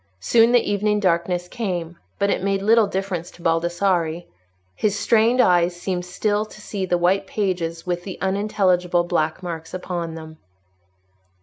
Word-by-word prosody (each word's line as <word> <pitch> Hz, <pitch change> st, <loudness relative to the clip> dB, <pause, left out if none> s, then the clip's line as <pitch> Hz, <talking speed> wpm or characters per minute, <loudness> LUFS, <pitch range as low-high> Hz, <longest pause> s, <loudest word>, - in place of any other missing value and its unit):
Soon 230 Hz, -, +4 dB
the 245 Hz, -1 st, +3 dB
evening 210 Hz, +1 st, +1 dB
darkness 175 Hz, -1 st, 0 dB
came; 180 Hz, -6 st, -4 dB, 0.2 s
but 200 Hz, 0 st, +1 dB
it -, -, 0 dB
made 195 Hz, 0 st, 0 dB
little 220 Hz, 0 st, +5 dB
difference 190 Hz, -3 st, -3 dB
to 170 Hz, -, -16 dB
Baldassarre. 170 Hz, 0 st, 0 dB, 0.5 s
His 210 Hz, -1 st, 0 dB
strained 230 Hz, +3 st, +3 dB
eyes 175 Hz, -5 st, +4 dB
seemed 180 Hz, -1 st, -3 dB
still 205 Hz, +3 st, 0 dB
to 215 Hz, 0 st, -13 dB
see 200 Hz, -2 st, -4 dB
the 175 Hz, -, +2 dB
white 190 Hz, +3 st, +1 dB
pages 175 Hz, -6 st, -2 dB
with 175 Hz, -1 st, -2 dB
the 190 Hz, -1 st, -7 dB
unintelligible 190 Hz, -3 st, +1 dB
black 170 Hz, 0 st, -1 dB
marks 165 Hz, -1 st, -6 dB
upon 175 Hz, -3 st, -4 dB
them. 160 Hz, -1 st, -10 dB
180 Hz, 150 wpm, -22 LUFS, 175-200 Hz, 0.5 s, little